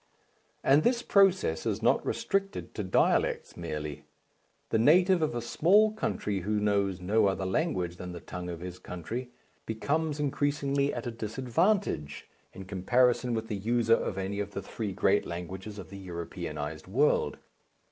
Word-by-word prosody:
And 140 +3 +5
this 240 +5 +1
process 190 - +3
is - - -2
not - - +3
restricted 195 +1 -2
to 105 - -3
dialects 95 - +1
merely. 75 -3 -5 0.7
The 110 - +3
native 180 - +5
of 155 -6 0
a 120 - -2
small 200 - +4
country 105 - -2
who 105 +3 -1
knows 100 -3 +1
no 100 +4 +2
other 95 -1 -1
language 95 - -1
than 90 0 -6
the 85 - -7
tongue 90 +1 -7
of 85 -1 -6
his 90 0 -7
country 110 +9 -6 0.4
becomes 150 +7 -1
increasingly 140 -1 0
at 120 - -5
a 120 - -2
disadvantage 120 - -1 0.2
in 95 0 -9
comparison 120 +6 +2
with 110 0 -3
the 105 - -3
user 115 +3 +2
of 100 - 0
any 95 +1 -3
of 100 0 -4
the 100 - -3
three 105 0 -4
great - - +2
languages 95 +4 -6
of 100 - -9
the 100 - -8
Europeanized 80 -4 -6
world. 135 +10 +2
110 Hz, 155 wpm, -29 LUFS, 90-140 Hz, 0.7 s, And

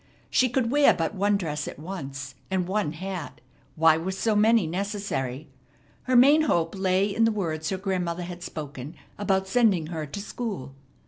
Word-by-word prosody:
She 255 - +3
could 240 -1 0
wear 290 0 +5
but 165 +3 -1
one 205 +1 +2
dress 150 -5 -3
at - - -7
once, 140 -5 -6 0.2
and 185 -2 0
one 195 -5 -1
hat. 180 -1 -6 0.4
Why 160 0 +5
were 175 +3 -3
so 210 +3 0
many 220 -1 +4
necessary? 165 -7 -3 0.6
Her 255 - +1
main 280 +6 +7
hope 170 - +1
lay 190 +1 +1
in 225 +2 +2
the 225 - +4
words 160 -7 -2
her 190 - -1
grandmother 180 -3 -2
had 175 0 -7
spoken 150 -2 -7 0.2
about 190 -2 +1
sending 195 -7 +3
her 155 -2 -4
to 145 - -6
school. 200 - -5
190 Hz, 175 wpm, -26 LUFS, 160-210 Hz, 0.6 s, main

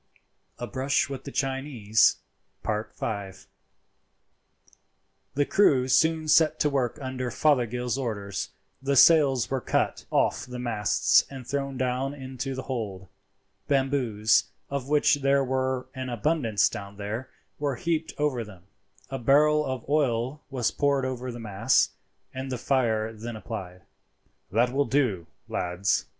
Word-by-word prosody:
A 120 - -4
BRUSH 135 +3 0
WITH 135 -1 -6
THE 140 - -6
CHINESE.—V. 110 -5 -1 2.0
The 145 +1 +2
crew 135 -11 +3
soon 160 +4 +3
set 155 +1 +4
to 150 - +2
work 135 -1 0
under 130 -2 -4
Fothergill's 125 -2 +1
orders. 100 -6 -3 0.3
The 140 +1 0
sails 135 -5 +5
were 135 -2 0
cut - - -1
off - - +1
the 125 0 -7
masts 110 -4 +3
and 130 -3 -9
thrown 140 0 -3
down 130 +2 -1
into 130 0 -5
the 130 - -5
hold; 100 -8 -5 0.6
bamboos, 130 -6 +2 0.3
of 140 -1 -3
which 150 0 +4
there 140 0 +3
were 130 0 -1
an 130 -2 -5
abundance 120 -3 +1
down 100 0 -7
there, 110 +5 -5 0.3
were 145 -2 -1
heaped 160 +4 -1
over 145 -5 0
them, 100 -5 -13 0.5
a 135 - -3
barrel 150 +4 +4
of 130 -4 -4
oil 135 -1 0
was 130 -4 0
poured 140 -2 +1
over 130 -1 -4
the 120 - -8
mass, 110 +3 +2 0.4
and 130 +1 -5
the 125 - -2
fire 115 -4 0
then 115 +1 -7
applied. 95 -5 -7 0.7
"That 120 +4 +2
will 140 +1 +2
do, 115 - 0 0.2
lads. 90 +3 -1
130 Hz, 135 wpm, -27 LUFS, 115-140 Hz, 2.0 s, sails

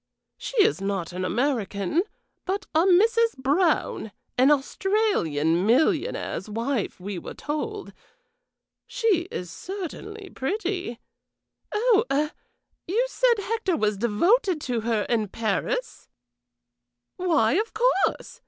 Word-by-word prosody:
"She - - -6
is 435 - +1
not 195 -3 -2
an 185 +1 -3
American, 220 - 0 0.4
but 395 +2 -2
a 320 +3 +4
Mrs. 450 +3 +4
Brown, 280 - +1 0.2
an 260 +3 +5
Australian 270 - +1
millionaire's 235 -5 +1
wife, 230 0 -2
we 190 0 -5
were - - -8
told. 400 +8 -4 0.9
She 405 -8 +1
is 180 -2 -5
certainly 395 +2 -7
pretty. 360 - -3 0.7
Oh 450 0 +3
eh 295 +2 +1 0.6
you 445 +8 +2
said 485 -4 +2
Hector 400 -6 -1
was 210 -4 +1
devoted 340 - +2
to 245 -5 -2
her 220 -2 0
in 220 -3 0
Paris?" 230 - -2 1.1
"Why, 320 -11 +2
of 430 +7 0
course! 460 -3 +1
310 Hz, 110 wpm, -25 LUFS, -, 1.1 s, an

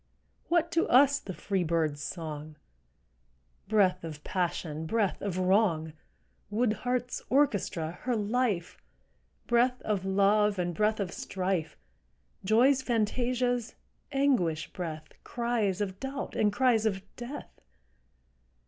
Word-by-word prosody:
What 340 0 +2
to 335 - +1
us 280 +2 +6
the 195 - -7
free 195 -3 -1
bird's 160 -3 0
song, 155 -2 -6 1.1
Breath 190 -4 +3
of 155 -2 -7
passion, 165 -4 -2
breath 210 +1 0
of 195 -3 -2
wrong, 185 -4 +2 0.6
Wood 215 +1 +1
heart's 250 +1 -2
orchestra, 200 - +1
her 250 -1 0
life, 210 -4 -1 0.7
Breath 245 +1 +2
of 205 -3 -1
love 200 +2 +3
and 175 -1 -1
breath 215 +4 +1
of 190 -3 -2
strife, 185 -3 -2 0.7
Joy's 250 +7 +4
fantasias, 245 +1 0 0.4
anguish 250 - +1
breath, 160 -5 -5
Cries 235 -5 -1
of 190 -2 -3
doubt 270 +1 -5
and 210 -1 +3
cries 225 -1 +3
of 195 -2 -2
death? 245 +4 -8
210 Hz, 115 wpm, -29 LUFS, 180-245 Hz, 1.1 s, us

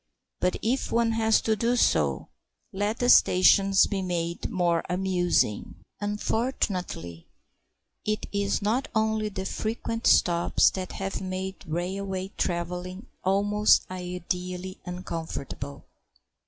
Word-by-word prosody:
But 180 - +1
if 250 +4 0
one 230 0 +2
has 225 -1 +3
to 220 - +1
do 235 +3 +1
so, - - +1 0.4
let 205 +3 -1
the 245 - 0
stations 195 -2 +6
be 200 -2 -2
made 170 -2 -2
more 175 -2 +1
amusing. 180 - 0 0.2
Unfortunately, 205 - -2 0.8
it 215 0 -1
is 200 0 0
not 230 +6 +1
only 220 -1 +1
the 190 -2 -5
frequent 225 +3 -2
stops 170 -1 +4
that 185 -1 -5
have 195 0 -4
made 190 0 -5
railway 190 +3 -3
travelling 180 +2 -3 0.2
almost 205 +2 +3
ideally 180 0 -5
uncomfortable. 165 -6 -6
190 Hz, 110 wpm, -27 LUFS, 180-210 Hz, 0.8 s, stations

